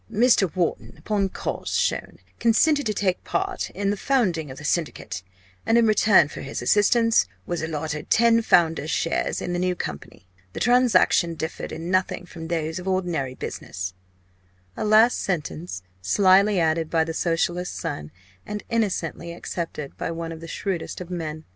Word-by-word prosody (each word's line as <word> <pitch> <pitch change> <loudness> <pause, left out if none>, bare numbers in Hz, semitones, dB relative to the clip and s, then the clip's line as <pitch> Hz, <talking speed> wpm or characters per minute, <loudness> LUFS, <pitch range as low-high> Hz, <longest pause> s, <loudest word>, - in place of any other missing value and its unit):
"Mr. 225 -5 +4
Wharton, 175 -3 -1
upon 200 -2 -1
cause - - -4
shown, - - -1 0.2
consented 285 +5 +3
to 215 - 0
take 185 -3 0
part 385 0 -2
in 200 +1 -1
the - - 0
founding 195 - 0
of 130 - -9
the - - -9
Syndicate, 150 - -2 0.4
and 225 - +3
in 235 - +5
return 210 -6 +5
for - - -8
his 135 - -5
assistance, 225 - +3 0.2
was 175 -1 -3
allotted 155 -1 -4
ten 230 0 +5
founders' 165 -6 +3
shares 165 - -1
in 175 - -3
the 175 - -1
new 180 0 0
company. 80 - -7 0.3
The - - -5
transaction 225 -8 +4
differed 160 0 -5
in 165 +3 -5
nothing 185 -1 0
from 165 -2 -9
those 160 0 -2
of 180 - -8
ordinary 175 -9 -1
business" 95 -5 -5 0.8
a - - -3
last 215 +3 +5
sentence 165 - -3 0.2
slily 195 - +4
added 160 -1 +1
by 165 -1 +2
the 165 0 -4
Socialist 175 +2 -1
son, 145 - -4 0.3
and 210 0 -6
innocently 185 -7 -1
accepted 165 -4 -5
by - - -3
one 165 0 -4
of 165 0 -8
the 165 - -8
shrewdest 185 -1 -4
of 180 0 -8
men. 160 -3 -4
175 Hz, 165 wpm, -24 LUFS, 160-205 Hz, 0.8 s, in